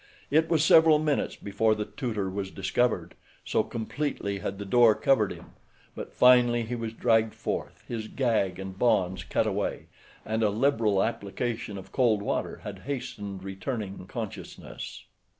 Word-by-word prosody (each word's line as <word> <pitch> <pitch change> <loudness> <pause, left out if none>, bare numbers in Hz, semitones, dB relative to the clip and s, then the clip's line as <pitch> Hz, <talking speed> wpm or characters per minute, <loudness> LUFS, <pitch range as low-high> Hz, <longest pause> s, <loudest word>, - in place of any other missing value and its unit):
It 160 +2 +3
was 160 -3 +3
several 160 -1 +7
minutes 150 -2 0
before 110 +2 +1
the 105 0 -3
tutor 110 -7 -3
was 95 0 -4
discovered, 100 +6 0 0.3
so - - +2
completely 115 -4 -3
had 100 +1 -4
the 100 - -6
door 115 +1 +5
covered 120 -7 +2
him; - - -10 0.4
but - - -7
finally 120 -1 +5
he 115 +2 -5
was 115 -2 -3
dragged 115 -2 +2
forth, - - -4
his 110 -2 -4
gag 110 -8 0
and 95 0 -7
bonds 95 -6 +2
cut - - 0
away, - - -2 0.4
and 110 +1 -1
a 110 - +3
liberal 110 -3 +2
application 110 0 -3
of 95 - -10
cold 110 -6 +2
water - - -2
had - - -7
hastened 100 -8 -5
returning 95 0 -5
consciousness. 105 - -7
110 Hz, 150 wpm, -27 LUFS, 100-125 Hz, 0.4 s, several